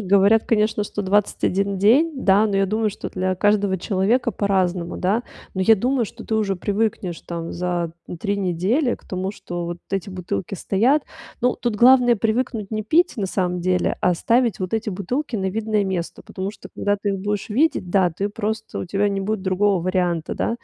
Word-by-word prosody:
говорят, 200 Hz, +3 st, +4 dB
конечно, 215 Hz, -1 st, +1 dB
что 205 Hz, -, -4 dB
21 200 Hz, 0 st, +1 dB
день. 250 Hz, -, +4 dB
Да, 200 Hz, +2 st, +5 dB
но 200 Hz, -2 st, -1 dB
я 195 Hz, 0 st, +3 dB
думаю, 215 Hz, +2 st, 0 dB
что 205 Hz, -, -6 dB
для 185 Hz, 0 st, -1 dB
каждого 205 Hz, 0 st, +2 dB
человека 200 Hz, +7 st, +1 dB
по-разному, 185 Hz, -4 st, 0 dB
да. 210 Hz, +6 st, 0 dB, 0.3 s
Но 190 Hz, -, -2 dB
я 225 Hz, +4 st, +6 dB
думаю, 245 Hz, +4 st, +1 dB
что 230 Hz, +2 st, -10 dB
ты 220 Hz, -, -1 dB
уже 205 Hz, -3 st, +1 dB
привыкнешь 200 Hz, -2 st, -2 dB
там 170 Hz, -1 st, -5 dB
за 175 Hz, -1 st, -2 dB, 0.3 s
3 200 Hz, -1 st, -1 dB
недели 200 Hz, -, +1 dB
к -, -, -18 dB
тому, 190 Hz, +1 st, -3 dB
что 175 Hz, -4 st, -6 dB
вот 175 Hz, 0 st, -5 dB
эти 195 Hz, 0 st, -2 dB
бутылки 185 Hz, 0 st, -4 dB
стоят. 235 Hz, -, +2 dB, 0.4 s
Ну, 250 Hz, 0 st, +2 dB
тут 240 Hz, -3 st, -1 dB
главное 245 Hz, +2 st, +6 dB
привыкнуть 225 Hz, -1 st, -1 dB
не 215 Hz, -1 st, -3 dB
пить 325 Hz, +10 st, +3 dB
на 205 Hz, -4 st, -1 dB
самом 180 Hz, -1 st, -1 dB
деле, 180 Hz, +1 st, +1 dB
а 180 Hz, -, +3 dB
ставить 230 Hz, +3 st, +1 dB
вот 185 Hz, -1 st, -3 dB
эти 225 Hz, -1 st, -1 dB
бутылки 230 Hz, +9 st, -3 dB
на 190 Hz, -3 st, -1 dB
видное 215 Hz, 0 st, 0 dB
место, 185 Hz, -3 st, -4 dB
потому 190 Hz, +2 st, -5 dB
что -, -, -12 dB
когда 205 Hz, 0 st, 0 dB
ты 205 Hz, 0 st, -3 dB
их 195 Hz, -, -2 dB
будешь 205 Hz, +1 st, -3 dB
видеть, 230 Hz, -, +1 dB
да, 185 Hz, -2 st, +3 dB
ты 195 Hz, +5 st, -2 dB
просто 220 Hz, +1 st, -4 dB
у -, -, -3 dB
тебя 200 Hz, +3 st, 0 dB
не 195 Hz, -1 st, -2 dB
будет 205 Hz, 0 st, -2 dB
другого 190 Hz, -1 st, +1 dB
варианта, 180 Hz, -3 st, 0 dB
да. -, -, -1 dB
200 Hz, 195 wpm, -22 LUFS, 185-220 Hz, 0.4 s, я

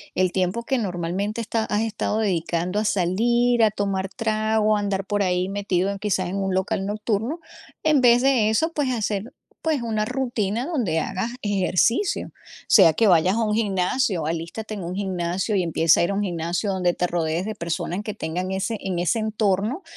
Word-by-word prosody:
el 185 Hz, -1 st, +2 dB
tiempo 185 Hz, +5 st, -1 dB
que 265 Hz, +2 st, 0 dB
normalmente 195 Hz, +2 st, -2 dB
está 225 Hz, 0 st, -1 dB
has 210 Hz, +1 st, 0 dB
estado 220 Hz, -1 st, -1 dB
dedicando 180 Hz, -1 st, -1 dB
a 215 Hz, -, -1 dB
salir, 235 Hz, +6 st, +2 dB
a 215 Hz, -, +4 dB
tomar 195 Hz, -2 st, -2 dB
trago, 215 Hz, -1 st, +1 dB
a -, -, -1 dB
andar 195 Hz, -1 st, -1 dB
por 205 Hz, 0 st, 0 dB
ahí 180 Hz, 0 st, 0 dB
metido 195 Hz, -2 st, 0 dB
en 200 Hz, -, -4 dB
quizás 190 Hz, -3 st, -1 dB
en 195 Hz, -, -3 dB
un 190 Hz, -1 st, -1 dB
local 190 Hz, 0 st, -1 dB
nocturno, 215 Hz, -, -2 dB, 0.4 s
en 310 Hz, -2 st, +4 dB
vez 245 Hz, 0 st, +6 dB
de 255 Hz, -5 st, +3 dB
eso, 275 Hz, +10 st, +1 dB
pues 290 Hz, -3 st, 0 dB
hacer, 215 Hz, -2 st, -2 dB, 0.3 s
pues, 310 Hz, -5 st, 0 dB
una 220 Hz, -2 st, -1 dB
rutina 240 Hz, -2 st, -2 dB
donde 235 Hz, -, 0 dB
hagas 205 Hz, +8 st, -3 dB
ejercicio, 205 Hz, -, +1 dB, 0.4 s
sea 175 Hz, -7 st, +7 dB
que 225 Hz, +6 st, +3 dB
vayas 180 Hz, +1 st, +4 dB
a 230 Hz, -, +1 dB
un 210 Hz, -, 0 dB
gimnasio, 195 Hz, -, 0 dB
alístate 170 Hz, +7 st, -4 dB
en 195 Hz, -, -6 dB
un 175 Hz, +2 st, -4 dB
gimnasio 190 Hz, +1 st, -2 dB
y 185 Hz, -, +2 dB
empieza 165 Hz, -1 st, +3 dB
a -, -, +3 dB
ir 200 Hz, -, -2 dB
a -, -, -1 dB
un 205 Hz, -, 0 dB
gimnasio 175 Hz, +2 st, -2 dB
donde 180 Hz, -2 st, +1 dB
te 180 Hz, -, -1 dB
rodees 170 Hz, +1 st, -1 dB
de 215 Hz, 0 st, -4 dB
personas 170 Hz, +1 st, -3 dB
que 210 Hz, -, -4 dB
tengan 180 Hz, -1 st, -4 dB
ese, 195 Hz, +4 st, -2 dB
en 185 Hz, -3 st, -3 dB
ese 180 Hz, +6 st, +1 dB
entorno 215 Hz, -, 0 dB
200 Hz, 190 wpm, -23 LUFS, 180-225 Hz, 0.4 s, sea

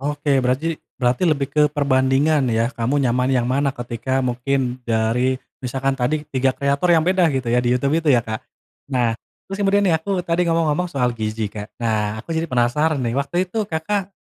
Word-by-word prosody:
Oke. 145 Hz, -1 st, 0 dB
Beraji 135 Hz, +6 st, -1 dB, 0.2 s
berarti 125 Hz, +6 st, +1 dB
lebih 145 Hz, -4 st, +1 dB
ke 150 Hz, -, +3 dB
perbandingan 140 Hz, 0 st, +2 dB
ya? 115 Hz, +2 st, +1 dB
Kamu 125 Hz, +4 st, -1 dB
nyaman 125 Hz, 0 st, +1 dB
yang 125 Hz, -2 st, +2 dB
mana 140 Hz, +1 st, +1 dB
ketika 125 Hz, +2 st, -2 dB
mungkin 125 Hz, 0 st, -1 dB
dari 115 Hz, +3 st, +1 dB, 0.2 s
misalkan 135 Hz, +2 st, -1 dB
tadi 150 Hz, +5 st, 0 dB
3 130 Hz, -1 st, +1 dB
kreator 140 Hz, +5 st, 0 dB
yang 165 Hz, -2 st, +4 dB
beda 185 Hz, 0 st, +3 dB
gitu 130 Hz, -2 st, -2 dB
ya, 125 Hz, -, +3 dB
di 120 Hz, 0 st, +2 dB
Youtube 140 Hz, +4 st, 0 dB
itu 155 Hz, -, -1 dB
ya, 120 Hz, -2 st, +3 dB
Kak? 110 Hz, -1 st, -4 dB, 0.5 s
Nah, 120 Hz, -3 st, +1 dB, 0.3 s
terus 195 Hz, +1 st, -6 dB
kemudian 200 Hz, +1 st, +3 dB
nih 175 Hz, -, +3 dB
aku 185 Hz, +2 st, -2 dB
tadi 170 Hz, +1 st, +1 dB
ngomong-ngomong 165 Hz, +1 st, +1 dB
soal 125 Hz, -4 st, +1 dB
gizi, 110 Hz, -1 st, -2 dB
Kak. 105 Hz, 0 st, -8 dB
Nah, 110 Hz, -2 st, -1 dB
aku 165 Hz, -, -6 dB
jadi 165 Hz, +1 st, -1 dB
penasaran 130 Hz, +5 st, +1 dB
nih, 120 Hz, -1 st, -1 dB
waktu 175 Hz, +6 st, -1 dB
itu 220 Hz, +3 st, -1 dB
Kakak 195 Hz, +3 st, -2 dB
135 Hz, 190 wpm, -21 LUFS, 120-155 Hz, 0.5 s, yang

